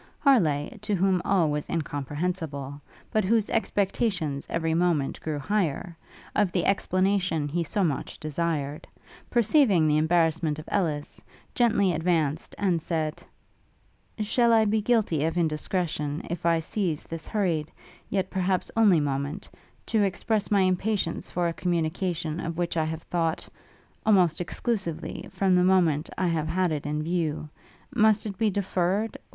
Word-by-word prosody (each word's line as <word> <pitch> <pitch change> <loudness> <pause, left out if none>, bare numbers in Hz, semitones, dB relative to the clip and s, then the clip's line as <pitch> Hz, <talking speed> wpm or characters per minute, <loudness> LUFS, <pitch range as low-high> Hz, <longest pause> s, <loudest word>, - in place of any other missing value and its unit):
Harleigh, 170 - +2
to 210 -1 -1
whom 190 -1 +2
all 180 -6 +2
was 150 0 -3
incomprehensible, 145 -1 -3 0.3
but 215 - +2
whose 215 +2 +1
expectations 190 - 0
every 165 -1 0
moment 165 -5 +1
grew 155 -2 -3
higher, 175 +1 -1 0.4
of 205 -4 +2
the 175 -2 0
explanation 185 -5 +1
he 170 +4 -1
so 195 +5 -1
much 155 -6 -2
desired, 155 -2 -2 0.4
perceiving 230 - +4
the 150 0 +3
embarrassment 160 -1 +2
of 155 - -9
Ellis, 155 -7 -2 0.3
gently 215 -6 +3
advanced, 160 -2 0
and 180 -5 +1
said, 155 -2 -2 1.0
'Shall 235 +3 +2
I 220 -1 +5
be 215 +1 +1
guilty 210 -10 +1
of 165 +2 -1
indiscretion, 155 -2 -1
if 170 0 -2
I 165 -1 +3
seize 170 -3 -2
this 165 -2 -7
hurried, 170 -7 -1 0.4
yet 190 -1 -1
perhaps 185 0 0
only 210 -7 +5
moment, 140 0 -2 0.4
to 220 -2 +1
express 205 +2 0
my 200 -2 +4
impatience 185 -1 0
for 175 0 0
a 170 - -1
communication 170 -1 -1
of 165 -1 -4
which 175 -1 -1
I 160 -1 +1
have 160 +1 -4
thought, 165 -2 -1 0.6
almost 180 -6 +3
exclusively, 180 -2 -3
from 190 -2 +2
the 180 - +4
moment 175 -5 +3
I 185 - +1
have 160 -2 -1
had 180 +1 +1
it 145 -2 -3
in 150 +1 -2
view? 160 -2 -2 0.4
Must 215 0 +3
it 195 -3 -6
be 220 - +3
deferred? 195 +2 -1
175 Hz, 145 wpm, -26 LUFS, 155-195 Hz, 1.0 s, I